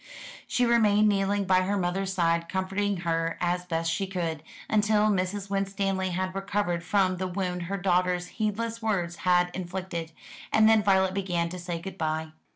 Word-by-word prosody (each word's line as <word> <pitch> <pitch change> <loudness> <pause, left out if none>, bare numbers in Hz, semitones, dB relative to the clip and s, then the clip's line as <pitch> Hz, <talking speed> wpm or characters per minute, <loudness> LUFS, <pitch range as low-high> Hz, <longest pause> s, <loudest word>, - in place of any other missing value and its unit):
She 250 - +1
remained 215 -3 +4
kneeling 200 0 +1
by 185 0 +4
her 200 +2 0
mother's 190 +1 -1
side 170 -2 +1
comforting 195 +1 -1
her 165 0 0
as 180 0 -1
best 165 -1 -1
she 195 +4 -1
could, 170 -5 -3 0.3
until 215 0 +3
Mrs. 195 +1 -1
Winstanley 195 -1 -1
had 185 +1 -2
recovered 195 -3 -1
from 185 -1 +2
the 185 +1 -2
wound 180 -1 -3
her 200 - -1
daughter's 180 -1 +1
heedless 225 +2 -1
words 180 -6 -1
had 180 -1 +2
inflicted, 180 -2 -5 0.4
and 220 0 +5
then 220 -1 +5
Violet 190 -2 +3
began 180 -3 -1
to 180 +1 -7
say 175 -1 -4
good 190 +2 -8
bye. 160 0 -1
185 Hz, 165 wpm, -27 LUFS, 175-200 Hz, 0.4 s, and